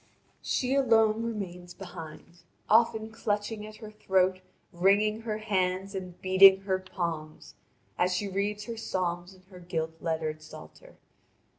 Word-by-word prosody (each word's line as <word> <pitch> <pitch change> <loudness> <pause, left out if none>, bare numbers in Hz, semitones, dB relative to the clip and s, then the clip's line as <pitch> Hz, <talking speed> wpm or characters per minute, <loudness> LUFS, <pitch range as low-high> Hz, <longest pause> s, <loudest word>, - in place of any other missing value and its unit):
She 255 0 0
alone 225 -5 +4
remains 185 -6 -5
behind, 170 -2 -10 0.3
often 220 0 +3
clutching 210 -1 -2
at 215 - -11
her 215 -1 -10
throat, 190 -3 +1 0.3
wringing 205 +5 +3
her 220 -2 -3
hands, 195 -2 -1
and 185 -2 -7
beating 190 +1 +7
her 190 -1 -1
palms, 170 -4 -5 0.5
as 180 +1 +3
she 200 +3 -1
reads 200 +2 -2
her 230 +1 -6
psalms 180 -3 -3
in 185 - -21
her 180 - -11
gilt 165 -2 -4
lettered 160 -2 -2
psalter. 155 - -13
190 Hz, 135 wpm, -29 LUFS, 175-215 Hz, 0.5 s, beating